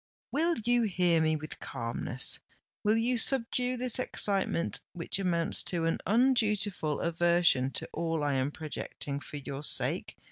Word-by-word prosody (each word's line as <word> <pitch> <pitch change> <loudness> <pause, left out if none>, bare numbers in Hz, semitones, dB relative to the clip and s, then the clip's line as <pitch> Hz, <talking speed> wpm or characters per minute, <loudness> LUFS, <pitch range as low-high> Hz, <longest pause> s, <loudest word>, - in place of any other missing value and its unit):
"Will 330 +4 +1
you 240 0 +3
hear 180 -6 +2
me 155 0 +2
with 155 0 -8
calmness?—will 125 - -2
you 240 +2 0
subdue 250 0 +2
this 250 0 +1
excitement, 195 -8 +2
which 175 +2 -2
amounts 170 -3 +1
to 170 -2 0
an 165 - 0
undutiful 210 - +1
aversion 170 -5 +3
to - - -2
all 165 -2 -2
I 145 -1 0
am 135 +1 0
projecting 150 -2 -5
for 145 +1 -8
your 140 0 -6
sake?" 150 - +2
175 Hz, 140 wpm, -29 LUFS, 155-225 Hz, -, you